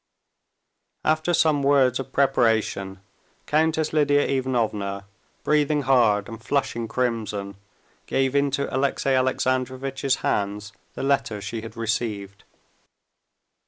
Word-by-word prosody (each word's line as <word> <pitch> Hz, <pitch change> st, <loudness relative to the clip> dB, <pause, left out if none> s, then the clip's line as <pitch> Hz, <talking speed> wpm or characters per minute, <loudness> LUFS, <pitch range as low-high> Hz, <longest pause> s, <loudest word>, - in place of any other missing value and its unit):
After 155 Hz, +2 st, +1 dB
some 155 Hz, -4 st, +3 dB
words 135 Hz, -3 st, +3 dB
of 135 Hz, 0 st, -6 dB
preparation, 110 Hz, -8 st, +1 dB, 0.4 s
Countess 155 Hz, 0 st, +1 dB
Lidia 145 Hz, -2 st, +3 dB
Ivanovna, 110 Hz, -7 st, -1 dB, 0.4 s
breathing 150 Hz, -1 st, +2 dB
hard 115 Hz, -6 st, +3 dB
and 115 Hz, -1 st, -9 dB
flushing 120 Hz, -4 st, -1 dB
crimson, 110 Hz, -5 st, -2 dB, 0.5 s
gave 135 Hz, 0 st, 0 dB
into 140 Hz, 0 st, +1 dB
Alexey 135 Hz, 0 st, 0 dB
Alexandrovitch's 130 Hz, +1 st, 0 dB
hands 100 Hz, 0 st, -1 dB, 0.2 s
the -, -, -4 dB
letter 115 Hz, -6 st, 0 dB
she 105 Hz, +3 st, -5 dB
had 115 Hz, +1 st, -10 dB
received. 105 Hz, -3 st, -3 dB
130 Hz, 100 wpm, -24 LUFS, 110-140 Hz, 0.5 s, some